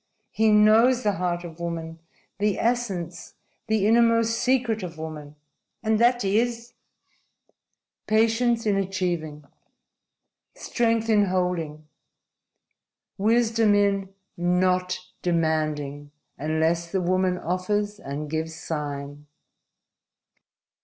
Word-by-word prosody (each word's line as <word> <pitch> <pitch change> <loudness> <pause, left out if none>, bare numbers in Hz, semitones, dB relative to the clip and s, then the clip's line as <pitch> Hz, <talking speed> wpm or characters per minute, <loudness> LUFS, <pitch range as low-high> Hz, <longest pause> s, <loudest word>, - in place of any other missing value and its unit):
He 220 0 +2
knows 220 +4 +5
the 210 - +2
heart 180 -2 -2
of 170 -1 -10
woman 165 -1 -5 0.4
the 205 -1 +1
essence, 195 -8 -2 0.3
the 215 -2 +1
innermost 230 0 +4
secret 245 -4 +1
of 170 -3 -7
woman." 155 -2 -8 0.5
"And 220 -1 +1
that 240 -1 +3
is 230 +4 0 0.7
" - - -48
"Patience 225 +2 +2
in 205 -2 +2
achieving. 175 -6 -3 1.1
Strength 230 -2 0
in 210 -2 +4
holding. 180 -5 -2 1.3
Wisdom 225 0 +3
in 200 -1 +1 0.3
not 180 +1 +1 0.2
demanding 155 -4 -1 0.3
unless 160 +3 -1
the 190 - 0
woman 185 0 +1
offers 205 +4 -2
and 145 +2 -5
gives 160 +1 -3
sign." 145 -2 -5
185 Hz, 100 wpm, -25 LUFS, 160-220 Hz, 1.3 s, knows